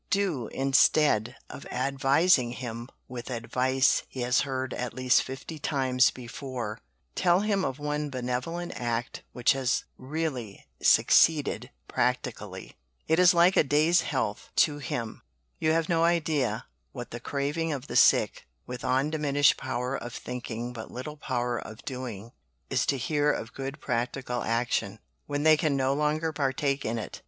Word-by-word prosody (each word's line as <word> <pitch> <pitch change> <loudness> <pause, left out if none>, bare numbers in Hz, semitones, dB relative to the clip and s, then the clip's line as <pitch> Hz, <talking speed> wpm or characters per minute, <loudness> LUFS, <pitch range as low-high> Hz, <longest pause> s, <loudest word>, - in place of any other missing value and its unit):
Do, 180 - 0
instead 135 -3 +3
of - - -10
advising 135 +1 +2
him 120 -1 -6 0.2
with 125 -1 -7
advice 125 +2 +1
he 130 - -6
has 125 +1 +2
heard 130 -2 -3
at 125 -1 -4
least 130 0 +4
fifty 135 +4 -7
times 130 -3 +2
before, 125 -2 -6 0.3
tell 175 +1 +3
him 205 -2 +1
of 135 -4 -2
one 150 0 -2
benevolent 130 +7 -3
act 120 0 -3
which 125 -1 +2
has 130 -2 0 0.2
really 130 -7 -4 0.2
succeeded 155 -3 +4 0.2
practically - - -2 0.3
it 160 +2 +3
is 180 -1 +6
like 175 +2 +5
a - - +5
day's 155 +4 +3
health 130 -10 -3
to 145 -1 +3
him. 120 -5 -4 0.4
You 155 - +2
have 165 0 +1
no 165 -1 +2
idea 155 -9 +1 0.3
what - - -7
the 120 - -5
craving 145 +5 -2
of 140 -3 -4
the - - -7
sick, - - +4 0.2
with 125 - -7
undiminished 145 +2 +2
power 125 +2 -3
of 120 -2 -6
thinking 120 -1 -5
but 110 -2 -8
little 150 +5 -7
power 120 -4 -2
of 110 +3 -10
doing, 120 -5 -6 0.4
is - - +1
to 140 - +1
hear 145 +3 +1
of 115 -4 -5
good 135 +2 -6
practical 125 -1 -2
action, 115 -3 -1 0.3
when 145 0 -2
they 155 0 +7
can 150 -3 +1
no 135 0 +2
longer 150 +2 0
partake 140 -1 -1
in 115 +2 -1
it." 110 - -6
135 Hz, 150 wpm, -28 LUFS, 125-150 Hz, 0.4 s, they